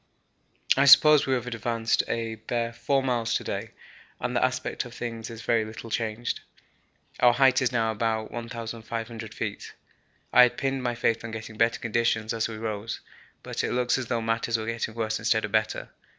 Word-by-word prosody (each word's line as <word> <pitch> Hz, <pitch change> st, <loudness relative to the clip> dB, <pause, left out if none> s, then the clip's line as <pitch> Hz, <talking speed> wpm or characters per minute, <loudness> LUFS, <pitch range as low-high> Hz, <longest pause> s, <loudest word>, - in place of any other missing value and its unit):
I 140 Hz, -, +4 dB
suppose 150 Hz, +1 st, +8 dB
we 130 Hz, -, +2 dB
have 125 Hz, -1 st, -3 dB
advanced 115 Hz, -1 st, 0 dB
a 115 Hz, -1 st, -2 dB
bare 115 Hz, +1 st, -3 dB
4 135 Hz, +3 st, 0 dB
miles 120 Hz, -3 st, 0 dB
to -, -, -1 dB
day -, -, -4 dB, 0.5 s
and -, -, -2 dB
the -, -, +2 dB
aspect -, -, -1 dB
of -, -, -11 dB
things 115 Hz, -1 st, -5 dB
is 115 Hz, -1 st, -9 dB
very 115 Hz, -2 st, +2 dB
little 110 Hz, +1 st, -8 dB
changed. 115 Hz, +1 st, -2 dB, 0.8 s
Our 120 Hz, -1 st, +6 dB
height 130 Hz, +1 st, +4 dB
is 130 Hz, -, +1 dB
now 115 Hz, -2 st, +1 dB
about 110 Hz, 0 st, -1 dB
1,500 115 Hz, -1 st, -6 dB
feet; 105 Hz, -2 st, -5 dB, 0.6 s
I 125 Hz, -, +9 dB
had 125 Hz, -1 st, +5 dB
pinned 135 Hz, -1 st, -1 dB
my 120 Hz, -1 st, -1 dB
faith 115 Hz, -1 st, 0 dB
on 115 Hz, -, -5 dB
getting 110 Hz, 0 st, -7 dB
better 115 Hz, +1 st, +2 dB
conditions 115 Hz, -1 st, 0 dB
as 115 Hz, -1 st, 0 dB
we 110 Hz, -1 st, -7 dB
rose, 110 Hz, 0 st, -4 dB, 0.4 s
but -, -, -3 dB
it -, -, -1 dB
looks 125 Hz, +1 st, +1 dB
as 125 Hz, -, -4 dB
though 115 Hz, -1 st, -1 dB
matters 115 Hz, +1 st, 0 dB
were 110 Hz, -, -4 dB
getting 115 Hz, -1 st, -3 dB
worse 110 Hz, -1 st, -1 dB
instead 110 Hz, 0 st, +1 dB
of 105 Hz, -, -7 dB
better. 110 Hz, 0 st, 0 dB
115 Hz, 190 wpm, -27 LUFS, 110-120 Hz, 0.8 s, I